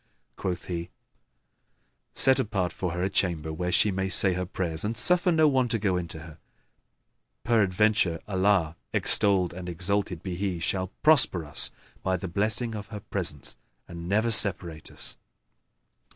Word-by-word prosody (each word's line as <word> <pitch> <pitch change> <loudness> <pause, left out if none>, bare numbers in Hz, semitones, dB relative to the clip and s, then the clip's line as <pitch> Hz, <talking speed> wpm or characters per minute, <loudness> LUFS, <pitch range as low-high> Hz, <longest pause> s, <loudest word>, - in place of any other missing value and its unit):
Quoth 90 -2 -4
he, 85 -1 -5 1.2
"Set 135 -1 +4
apart 100 -8 -2
for 90 -3 -4
her 90 +1 -3
a - - +1
chamber 80 -5 -1
where 90 +2 -3
she 105 +2 +3
may 95 0 -2
say 95 0 +5
her 90 0 -4
prayers; 85 -4 -2
and 110 +2 -3
suffer 180 +8 +2
no 160 -2 +4
one 130 -3 +1
to 115 -1 -1
go 100 -3 -1
in 90 -1 -3
to 80 - -8
her: 80 -1 -13 1.0
peradventure, 105 -5 +1
Allah 95 -4 +1 0.2
(extolled 95 -4 +4
and 90 0 -7
exalted 90 0 -2
be 95 - -5
He!) 95 0 -3
shall 95 +2 -2 0.2
prosper 140 - +4
us 75 - -2 0.3
by 95 -1 -1
the 95 - -6
blessing 110 +6 -1
of 105 -2 -7
her 105 0 -8
presence - - -3 0.3
and 85 0 -8
never 110 +4 +1
separate 90 -7 +3
us." - - -4
95 Hz, 160 wpm, -26 LUFS, 85-105 Hz, 1.2 s, say